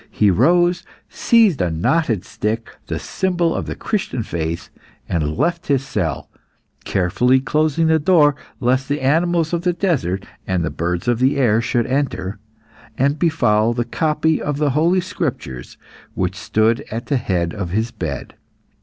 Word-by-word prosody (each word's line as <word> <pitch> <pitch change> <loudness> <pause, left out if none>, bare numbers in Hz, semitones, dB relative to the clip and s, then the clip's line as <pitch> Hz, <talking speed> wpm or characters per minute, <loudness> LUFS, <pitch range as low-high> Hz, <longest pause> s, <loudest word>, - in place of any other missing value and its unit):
He 105 -2 +3
rose, 175 - +3 0.3
seized 220 - +3
a 90 - +1
knotted 110 - 0
stick, 110 +2 -3 0.2
the - - -2
symbol 175 -3 -1
of - - -3
the - - -4
Christian 190 - -2
faith, 85 -1 -4 0.4
and 75 -2 -1
left 170 0 0
his 135 -2 +1
cell, 80 - -2 0.6
carefully 125 +8 +2
closing 155 +3 +1
the 160 0 +3
door, 150 -3 +4 0.2
lest 130 +2 +1
the 145 +1 0
animals 165 +4 +1
of 170 - 0
the 180 0 +1
desert 140 - -1 0.2
and 90 -3 0
the 80 - -3
birds 85 +4 -2
of 120 -1 +2
the 135 +3 +2
air 115 -4 +3
should 120 0 0
enter, 120 -8 -2 0.6
and 140 +3 +1
befoul 115 -10 +2
the 120 0 -1
copy 155 +1 0
of 145 -1 -2
the 150 -1 +1
Holy 170 +6 +2
Scriptures 135 - -5 0.4
which - - -1
stood 115 +5 +1
at 115 +2 -5
the 140 - 0
head 90 -8 -1
of 100 -5 -4
his 110 +5 -1
bed. 75 - -5
130 Hz, 160 wpm, -20 LUFS, 100-160 Hz, 0.6 s, door